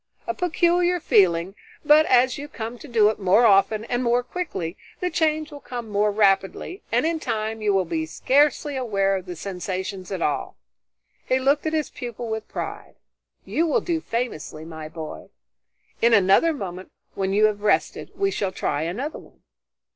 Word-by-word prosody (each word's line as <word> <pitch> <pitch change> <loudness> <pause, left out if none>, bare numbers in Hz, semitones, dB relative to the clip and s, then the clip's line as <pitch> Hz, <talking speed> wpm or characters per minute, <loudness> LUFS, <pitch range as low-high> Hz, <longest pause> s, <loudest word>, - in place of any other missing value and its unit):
A 350 - -2
peculiar 355 +1 +2
feeling, 190 - +3 0.3
but 305 +2 +6
as 255 0 +4
you 290 - -6
come 235 -3 -7
to - - -11
do 220 -4 +4
it 220 - -9
more 200 +5 +4
often 210 +1 +4
and 245 +1 -1
more 240 +1 +2
quickly, 245 - -4 0.2
the 360 0 -1
change 310 -1 0
will 290 - -9
come 240 -4 -7
more 210 +1 +2
rapidly 200 - +1
and - - +2
in 330 0 0
time 220 -3 -3
you 210 -1 +2
will 190 -2 +2
be 160 -1 -2
scarcely 285 - +2
aware 200 -6 +1
of 185 -1 -5
the 180 - -5
sensations 185 +1 -5
at 190 - -2
all." 150 - -2 0.7
He 255 - +3
looked 280 +4 +1
at 315 - -2
his 310 -3 -1
pupil 240 -1 -6
with 220 -1 -4
pride. - - -6 0.5
"You 335 +2 0
will 305 - +2
do 335 -2 -2
famously, 230 - -4
my 160 -1 -8
boy. 160 -1 -8 0.7
In 230 0 +5
another 200 - +4
moment, 185 - -6 0.2
when 195 0 -2
you 210 +2 +4
have 210 -1 0
rested, 210 - 0
we 395 0 0
shall 200 - -2
try 145 -5 -2
another 230 - -3
one." - - -19
220 Hz, 175 wpm, -24 LUFS, 195-290 Hz, 0.7 s, but